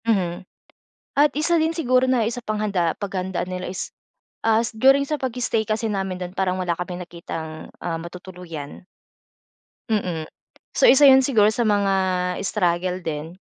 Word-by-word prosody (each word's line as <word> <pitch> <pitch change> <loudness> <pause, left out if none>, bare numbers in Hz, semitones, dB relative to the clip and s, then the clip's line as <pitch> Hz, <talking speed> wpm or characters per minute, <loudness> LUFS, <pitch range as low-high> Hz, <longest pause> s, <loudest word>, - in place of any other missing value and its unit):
Mhm. 185 -5 0 0.7
At 290 +1 +5
isa 310 +3 +1
din 320 - +2
siguro 255 -6 +2
na, 240 -4 +2
isa 240 +2 -3
pang 215 -2 -3
handa 190 -6 0
paghandaan 190 -3 -3
nila 180 0 -5
is, 185 - -6 0.5
as 225 0 +3
during 270 +4 +5
sa 305 - 0
pag-stay 245 -4 -1
kasi 215 +1 -1
namin 190 -3 -3
do'n, 180 +1 -6
parang 185 -1 0
wala 175 -2 -1
kaming 180 0 -5
nakitang, 165 -2 -7
ah, 165 -2 -2
matutuluyan. 170 -3 -9 1.0
Mm. 180 -7 -1 0.5
So, - - +4
isa 285 - +8
'yon 265 0 +6
siguro 215 -6 +4
sa 230 +2 0
mga, 205 -2 +2 0.5
struggle 180 -2 0
din, 160 0 -5
195 Hz, 150 wpm, -23 LUFS, 175-230 Hz, 1.0 s, isa